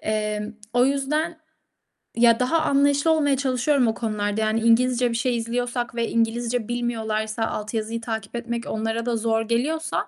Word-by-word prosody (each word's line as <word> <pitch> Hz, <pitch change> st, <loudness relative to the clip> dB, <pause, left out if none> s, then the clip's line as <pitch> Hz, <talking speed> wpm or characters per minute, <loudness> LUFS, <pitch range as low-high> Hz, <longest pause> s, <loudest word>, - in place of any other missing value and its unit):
Emm, 215 Hz, 0 st, -2 dB, 0.2 s
o 245 Hz, 0 st, +4 dB
yüzden 300 Hz, +4 st, -1 dB, 0.8 s
ya, 230 Hz, 0 st, +5 dB
daha 315 Hz, +6 st, +2 dB
anlayışlı 285 Hz, +2 st, +3 dB
olmaya 290 Hz, -4 st, +2 dB
çalışıyorum 260 Hz, -1 st, +2 dB
o 225 Hz, -, +1 dB
konularda. 210 Hz, -2 st, -2 dB
Yani 220 Hz, +1 st, +1 dB
İngilizce 240 Hz, +1 st, +3 dB
bir -, -, -2 dB
şey 240 Hz, 0 st, 0 dB
izliyorsak 240 Hz, +1 st, -2 dB
ve 235 Hz, -1 st, -1 dB
İngilizce 230 Hz, 0 st, 0 dB
bilmiyorlarsa, 225 Hz, -2 st, -2 dB
alt 215 Hz, +1 st, -5 dB
yazıyı 225 Hz, +1 st, -2 dB
takip 220 Hz, -1 st, -5 dB
etmek 235 Hz, 0 st, -4 dB
onlara 225 Hz, +1 st, -2 dB
da 240 Hz, -1 st, 0 dB
zor 225 Hz, 0 st, +1 dB
geliyorsa 295 Hz, +9 st, -1 dB
235 Hz, 155 wpm, -24 LUFS, 225-255 Hz, 0.8 s, ya